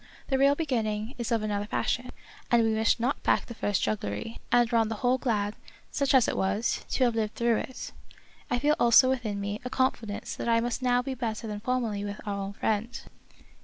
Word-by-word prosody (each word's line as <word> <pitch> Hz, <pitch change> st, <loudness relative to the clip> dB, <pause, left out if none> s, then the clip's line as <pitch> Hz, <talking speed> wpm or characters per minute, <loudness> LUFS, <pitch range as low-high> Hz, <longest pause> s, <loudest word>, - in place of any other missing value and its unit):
The 265 Hz, -1 st, +1 dB
real 280 Hz, +1 st, +5 dB
beginning 225 Hz, -7 st, -1 dB
is 235 Hz, 0 st, -3 dB
of 225 Hz, -2 st, +1 dB
another 205 Hz, -1 st, -2 dB
fashion; 250 Hz, +3 st, -1 dB, 0.4 s
and 235 Hz, -1 st, +4 dB
we 225 Hz, 0 st, +2 dB
wish 220 Hz, +2 st, +2 dB
not 250 Hz, +4 st, -1 dB
back -, -, +2 dB
the 235 Hz, -, -8 dB
first 205 Hz, -3 st, -1 dB
jugglery, 110 Hz, -, -3 dB
and 240 Hz, 0 st, +3 dB
are -, -, +5 dB
on 225 Hz, -1 st, +3 dB
the 225 Hz, -, -2 dB
whole 255 Hz, +1 st, +3 dB
glad, 210 Hz, -5 st, -1 dB, 0.4 s
such 275 Hz, -1 st, +1 dB
as 255 Hz, -, +5 dB
it -, -, -1 dB
was, 200 Hz, +4 st, 0 dB
to 260 Hz, -, +1 dB
have 240 Hz, -2 st, +3 dB
lived 220 Hz, -1 st, -2 dB
through 235 Hz, -1 st, +2 dB
it. 260 Hz, -, -6 dB, 0.6 s
I -, -, +1 dB
feel 290 Hz, +4 st, +3 dB
also 240 Hz, +2 st, +6 dB
.within 225 Hz, -6 st, -2 dB
me 205 Hz, +1 st, -4 dB
a 250 Hz, -, -4 dB
confidence 230 Hz, -5 st, -1 dB
that -, -, -4 dB
it 230 Hz, 0 st, +3 dB
must 240 Hz, +1 st, -2 dB
now 245 Hz, -1 st, +2 dB
be 270 Hz, -, -3 dB
better 230 Hz, -3 st, -3 dB
than 210 Hz, -1 st, -4 dB
formerly 230 Hz, -3 st, -1 dB
with 205 Hz, 0 st, -5 dB
our 205 Hz, -, -2 dB
old 200 Hz, 0 st, -4 dB
friend." 220 Hz, +2 st, -1 dB
230 Hz, 215 wpm, -28 LUFS, 210-250 Hz, 0.6 s, also